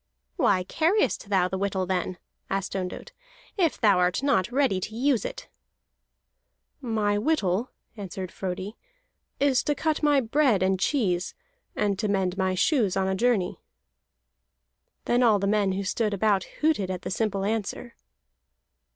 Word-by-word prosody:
"Why 185 -2 +2
carriest 330 - 0
thou 190 -3 +3
the 190 +1 -4
whittle, 195 -1 -1
then," 180 0 -2 0.3
asked 195 0 -2
Ondott, 185 -2 -5 0.4
"if 350 -7 +1
thou 200 -4 +4
art 180 +7 +1
not 240 -7 +2
ready 260 -8 +2
to 215 +4 -6
use 255 0 +1
it?" - - -6 1.3
"My 215 -4 0
whittle," 220 - 0 0.3
answered 190 -3 -6
Frodi, 190 +3 -5 0.6
"is 275 -2 +3
to 295 - 0
cut 315 0 -1
my 295 -2 +4
bread 245 -5 +2
and 190 0 +1
cheese, 190 -7 0 0.4
and 200 -2 0
to 215 - 0
mend 190 -2 0
my 190 -1 0
shoes 210 - +2
on 190 0 +1
a 190 - 0
journey." 205 -3 0 1.4
Then 240 +1 +2
all 225 -4 +5
the 200 - -2
men 200 -1 +2
who 195 +1 -2
stood 210 +2 -1
about 200 -1 +1 0.2
hooted 300 -12 +1
at 185 -1 -4
the - - -4
simple 200 -1 -1
answer. 220 +2 -3
205 Hz, 150 wpm, -26 LUFS, 190-245 Hz, 1.4 s, all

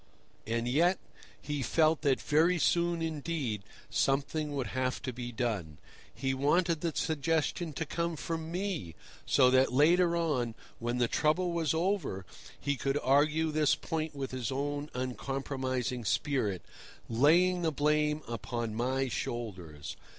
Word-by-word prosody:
And 115 +1 -1
yet 170 +9 +3 0.4
he 145 -1 -3
felt 155 +5 +3
that 140 -4 +2
very 165 +4 +3
soon 170 0 +2
indeed 150 - -2 0.3
something 145 +2 0
would 135 -3 -1
have 130 0 0
to 130 -2 -3
be 120 0 -5
done. 105 - -2 0.3
He 135 0 -2
wanted 160 +4 +2
the 170 - 0
suggestion 160 +2 0
to 160 - -3
come 170 +2 -2
from 160 +1 -4
me, 180 - -3 0.3
so 130 -2 +5
that 130 +1 +4
later 170 +6 +4
on, 130 -9 0 0.2
when 120 +1 -1
the 120 -1 +2
trouble 165 +7 +1
was 165 -2 0
over, 170 - -1 0.3
he 145 -1 -1
could 135 +2 0
argue 150 +4 +3
this 150 -1 +3
point 155 -2 -3
with 135 -2 -4
his 130 -3 -3
own 145 +2 -2
uncompromising 130 -1 -2
spirit, 105 - 0 0.4
laying 170 +10 +4
the 165 -2 +1
blame 150 +1 +1
upon 115 -1 -3
my 130 +4 0
shoulders. 90 - -5
145 Hz, 140 wpm, -31 LUFS, 125-160 Hz, 0.4 s, so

